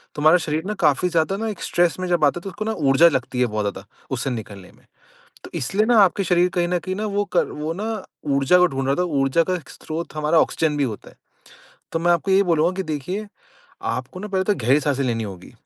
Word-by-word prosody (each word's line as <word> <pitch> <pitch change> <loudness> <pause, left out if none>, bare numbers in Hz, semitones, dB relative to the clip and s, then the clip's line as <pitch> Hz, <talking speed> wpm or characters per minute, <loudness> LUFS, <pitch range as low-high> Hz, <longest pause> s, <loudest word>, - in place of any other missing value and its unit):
तो 150 - -4
हमारा 160 +4 +6
शरीर 155 +1 -1
ना 210 - -2
काफ़ी 150 +4 +3
ज़्यादा 170 +3 +1
ना 225 +1 -3
एक 205 - -7
स्ट्रेस 175 0 +1
में 185 - -2
जब 175 -3 +1
आता 145 +4 +1
है - - -18
तो 195 - -6
उसको 215 +4 -6
ना 220 - -1
ऊर्जा 150 -2 +4
लगती 130 -3 -2
है 125 - +4
बहुत 105 -2 -2
ज़्यादा 100 -1 -4 0.3
उससे 130 +1 -1
निकलने 100 -6 -7
में। - - -25 0.6
तो - - -10
इसलिए 200 +12 0
ना 235 -2 +4
आपके 195 0 +3
शरीर 180 0 +3
कहीं 175 -1 +1
न 180 - +1
कहीं 185 +2 -4
ना 215 +1 -2
वो 205 0 -1
क - - +6
वो 155 +2 -4
ना 215 0 -4 0.3
ऊर्जा 140 +6 +4
को 180 - +6
ढूँढ 135 -5 -3
रहा 135 - +2
था, - - +1
ऊर्जा 145 -1 +2
का 185 +1 -1
स्रोत 160 +1 -7
हमारा 155 +2 +2
ऑक्सीजन 155 -2 0
भी 145 - +1
होता 110 -5 -6
है। - - -23 0.8
तो 165 - 0
मैं 175 +1 +1
आपको 170 +3 0
यही 195 +1 +5
बोलूँगा 170 -1 +2
कि 190 - -1
देखिए, 160 +7 -4 0.6
आपको 125 +10 -4
ना 210 - -6
पहले 190 -2 0
तो 205 - +2
गहरी 135 - +2
साँसें 140 -1 0
लेनी 115 -3 -1
होगी, 95 -3 -9
165 Hz, 250 wpm, -22 LUFS, 135-185 Hz, 0.8 s, हमारा